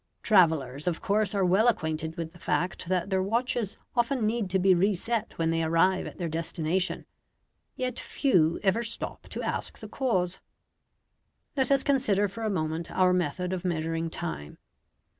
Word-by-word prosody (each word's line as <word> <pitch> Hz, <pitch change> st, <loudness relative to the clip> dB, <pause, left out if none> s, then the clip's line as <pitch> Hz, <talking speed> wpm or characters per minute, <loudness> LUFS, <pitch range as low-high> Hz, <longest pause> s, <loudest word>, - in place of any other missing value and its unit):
Travellers, 160 Hz, -, +3 dB
of 170 Hz, -2 st, 0 dB
course, 205 Hz, 0 st, +1 dB
are 195 Hz, -2 st, +2 dB
well 195 Hz, +6 st, +4 dB
acquainted 160 Hz, -6 st, 0 dB
with 165 Hz, -1 st, -5 dB
the 175 Hz, -, -15 dB
fact 180 Hz, 0 st, -1 dB
that 185 Hz, +1 st, 0 dB
their 190 Hz, 0 st, +2 dB
watches 230 Hz, +1 st, -1 dB, 0.2 s
often 240 Hz, -1 st, +1 dB
need 220 Hz, -2 st, 0 dB
to 190 Hz, -, +2 dB
be 190 Hz, 0 st, +5 dB
reset 210 Hz, +5 st, 0 dB
when 165 Hz, 0 st, +1 dB
they 165 Hz, 0 st, +1 dB
arrive 165 Hz, +4 st, +2 dB
at -, -, -9 dB
their 175 Hz, -, -2 dB
destination. 165 Hz, +3 st, -1 dB, 0.7 s
Yet 255 Hz, 0 st, -3 dB
few 170 Hz, -, +2 dB
ever 205 Hz, +4 st, +2 dB
stop 230 Hz, 0 st, -5 dB
to -, -, -5 dB
ask -, -, -3 dB
the -, -, -9 dB
cause. 185 Hz, -9 st, -1 dB, 1.2 s
Let 265 Hz, -2 st, +1 dB
us 275 Hz, -1 st, +4 dB
consider 215 Hz, -8 st, +2 dB
for 200 Hz, +4 st, -9 dB
a 220 Hz, -, 0 dB
moment 160 Hz, -3 st, -2 dB
our 185 Hz, -1 st, +3 dB
method 180 Hz, +1 st, -1 dB
of 185 Hz, -, -3 dB
measuring 165 Hz, -1 st, -1 dB
time. 75 Hz, -, -6 dB
185 Hz, 165 wpm, -28 LUFS, 165-215 Hz, 1.2 s, be